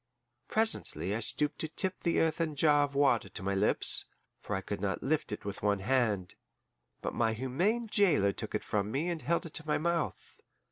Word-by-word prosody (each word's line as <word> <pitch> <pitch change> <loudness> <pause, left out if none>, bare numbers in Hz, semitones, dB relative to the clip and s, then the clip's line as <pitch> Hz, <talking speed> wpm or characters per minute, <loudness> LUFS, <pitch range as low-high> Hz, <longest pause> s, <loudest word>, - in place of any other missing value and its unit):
Presently 220 - +1
I 110 - -1
stooped 145 +6 0
to 160 - -1
tip 185 +4 -1
the 170 - +1
earthen 160 -1 0
jar 145 0 +4
of 140 -1 -11
water 135 -8 +2
to 90 - -7
my 100 +1 -1
lips, 100 +2 +4 0.4
for 105 - -3
I 95 - -2
could 100 0 -5
not 95 -2 -2
lift 150 -2 -1
it 105 - -6
with 100 -1 -5
one 105 -1 +2
hand, 105 -3 0 0.7
but - - -3
my 115 -1 +1
humane 175 - 0
jailer 170 - +3
took - - -5
it - - -2
from 105 -1 -1
me 145 +10 -1
and 170 -3 -3
held 170 +2 0
it 165 - -9
to 155 - -5
my 150 - +2
mouth. 170 0 -3
140 Hz, 200 wpm, -31 LUFS, 105-165 Hz, 0.7 s, jar